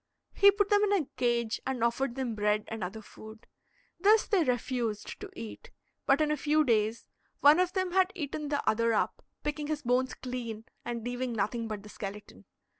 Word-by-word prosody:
He 400 - +7
put 405 +1 +1
them 410 0 +5
in 410 -1 +2
a 365 -7 +2
cage, 235 -2 0
and 260 -3 -2
offered 235 +2 0
them 260 -4 -2
bread 210 0 +1
and 225 -3 -4
other 215 +5 -5
food. 220 +2 -13 0.5
This 420 +4 +5
they 390 -6 +2
refused 245 -4 -2
to 405 - -7
eat, 225 -2 -8 0.4
but 275 +3 +4
in 300 0 +2
a 300 - +1
few 305 +2 +3
days 225 -3 +1 0.4
one 295 +4 +7
of 365 0 +1
them 375 -2 0
had 375 +1 +3
eaten 300 -2 -4
the 285 -1 -2
other 230 +1 +3
up, - - -1 0.2
picking 295 0 -2
his 300 -1 -3
bones 250 +1 +1
clean 235 -3 -5 0.2
and 235 -1 -4
leaving 245 +1 -3
nothing 225 +2 -1
but 210 -2 -5
the 210 - -11
skeleton. 205 0 -8
250 Hz, 190 wpm, -30 LUFS, 225-305 Hz, 0.5 s, He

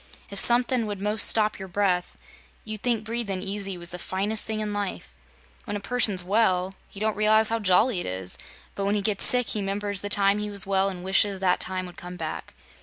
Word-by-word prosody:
"If 200 - -1
somethin' 240 0 +4
would 205 -2 -5
'most 210 +2 +2
stop 215 -1 +1
your 190 - -7
breath, 180 -1 -1 0.5
you'd 215 -1 -6
think 235 -3 0
breathin' 220 -4 -3
easy 195 -1 -3
was 175 0 -5
the 180 - -6
finest 205 +4 -2
thing 220 -1 -2
in 210 -1 -3
life. 205 -2 -5 0.5
When 205 - -4
a - - -2
person's 200 -3 +2
well, 190 -2 +1 0.2
he 195 - -11
don't 215 0 0
realize 215 +1 +5
how 230 0 0
jolly 205 +2 +3
it - - -4
is, 95 0 -4 0.4
but 200 - -3
when 200 +1 +1
he 205 - -1
gets 200 -1 +1
sick 250 -1 +3
he 210 - -2
'members 200 0 -2
the 205 - -5
time 200 0 +3
he 210 0 -3
was 200 -1 +1
well, 195 0 +1
an' 180 -2 -8
wishes 195 +1 +2
that 180 -1 +2
time 185 0 -1
would 180 - -12
come 180 0 -9
back. 160 -2 -6
200 Hz, 220 wpm, -25 LUFS, 190-215 Hz, 0.5 s, realize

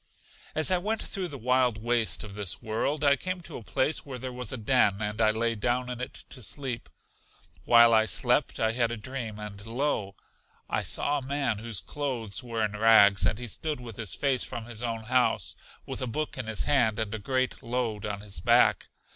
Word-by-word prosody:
As 155 +4 +5
I 185 - +4
went 215 +4 -2
through 190 -2 -3
the 145 - -8
wild 125 -1 +2
waste 115 +1 0
of 105 -2 -9
this 100 -3 -1
world, 120 +7 -2
I 140 -1 +5
came 185 +4 -4
to 155 -2 -9
a - - -9
place 145 +7 0
where 135 -3 -7
there 130 +1 -6
was 125 -3 -4
a 130 - -3
den, 105 -4 +2
and 105 +1 -2
I 110 - +5
lay 115 +2 +1
down 125 +3 -1
in 125 0 -6
it 125 - -6
to 130 - -7
sleep. 125 +2 -3 0.8
While 115 -1 +7
I 110 0 +5
slept - - +2
I 110 0 +2
had 120 0 +1
a 120 - -3
dream, 115 -2 -5
and 105 -1 -8
lo! 115 -4 -2 0.5
I - - -1
saw 145 0 +1
a 130 - -9
man 135 -6 -1
whose 115 -2 -2
clothes 120 -8 -4
were 115 -3 -1
in 105 - -3
rags 105 -3 +5
and 90 - 0
he 125 - -4
stood 150 +5 -3
with 115 -4 -9
his 110 -3 -4
face 135 -3 +1
from 115 -2 -6
his 120 -1 -6
own 115 -2 -3
house, 125 +2 +1 0.3
with - - -5
a 130 - -2
book 150 +6 -3
in 130 -4 -5
his 110 -2 0
hand, 120 -7 +2
and 110 -1 -2
a 110 - -3
great 130 +4 -1
load 115 -3 -2
on 100 -1 -3
his 105 -2 -4
back. - - +4
120 Hz, 215 wpm, -28 LUFS, 110-130 Hz, 0.8 s, While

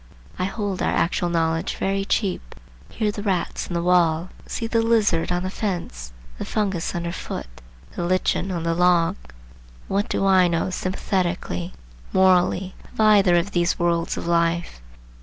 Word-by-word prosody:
I 185 - +1
hold 200 -1 -3
our - - +1
actual 175 +1 0
knowledge 165 +1 0
very 195 0 -1
cheap. 200 -2 -2 0.3
Hear 215 -2 -1
the 205 - -6
rats 190 -4 -1
in 175 - -4
the 170 - 0
wall, 175 -1 +3 0.2
see 230 - -3
the 225 0 +1
lizard 215 -8 +2
on 175 0 0
the 185 - -3
fence, 170 - -4 0.3
the - - -2
fungus 195 -7 -2
under 170 0 -2
foot, - - -5 0.5
the - - -3
lichen 185 +2 0
on 170 -2 -3
the 165 0 +1
log. 175 -1 +3 0.7
What 200 +2 -1
do 195 - 0
I 190 -2 +5
know 170 +2 -1
sympathetically, 185 -1 -2 0.4
morally, 190 0 +3 0.2
of - - -17
either 205 -4 +5
of 175 +4 +1
these 175 -1 +1
worlds 170 -1 0
of - - -4
life? 170 - 0
180 Hz, 160 wpm, -23 LUFS, 170-195 Hz, 0.7 s, I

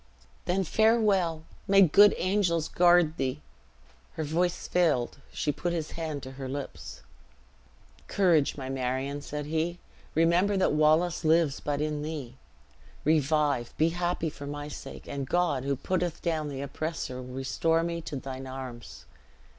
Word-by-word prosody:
"Then 190 +2 +1
farewell! 200 -6 +2 0.2
May 195 0 +7
good 200 +5 +6
angels 180 -4 +1
guard 175 -2 +4
thee!" 135 +1 -1 0.7
Her 160 - -3
voice 175 +4 -1
failed; 150 -8 +1
she 150 - -1
put 170 +5 -3
his 160 -3 -3
hand 155 -4 -4
to 130 - -7
her 130 - -4
lips. 130 - -7 1.1
"Courage, 170 -9 +2
my 130 -2 -5
Marion," 135 +2 -2
said 150 0 -5
he; 160 +3 -1 0.4
"remember 175 +5 +3
that 185 - +2
Wallace 155 +4 +3
lives 160 -2 +3
but 145 0 -2
in 150 -1 -1
thee. 150 -5 -5 0.7
Revive, 150 -4 +1
be 160 +2 +3
happy 175 -1 -1
for 140 - -9
my 145 0 -5
sake; 150 - -9
and 140 -1 -4
God, 170 -7 +1
who 140 0 +1
putteth 175 +4 -2
down 160 -3 -1
the 135 -1 -5
oppressor, 140 -2 -4
will 125 0 -9
restore 165 +5 +1
me 170 0 -3
to 155 - -6
thine 130 0 -6
arms." 120 - -8
155 Hz, 145 wpm, -28 LUFS, 140-175 Hz, 1.1 s, May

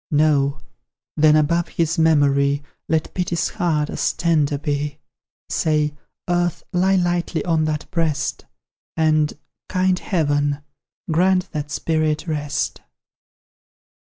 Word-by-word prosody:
No! 145 -2 +2 0.5
Then 155 0 +5
above 165 +3 +2
his 165 0 -1
memory 145 -3 +3 0.3
Let 160 -1 0
Pity's 170 -3 -1
heart 165 -7 0
as - - 0
tender 155 -4 +1
be; 145 0 -2 0.5
Say, 150 -1 +1 0.3
"Earth, 175 -1 0
lie 190 +2 +3
lightly 175 -2 0
on 165 -3 +2
that 155 -1 -2
breast, 160 -4 -1 0.5
And, 155 -1 +3 0.4
kind 185 -1 +1
Heaven, 145 -4 0 0.5
grant 180 +3 +2
that 150 -2 -4
spirit 155 0 0
rest!" 150 -3 -2
155 Hz, 105 wpm, -21 LUFS, 150-170 Hz, 0.5 s, Then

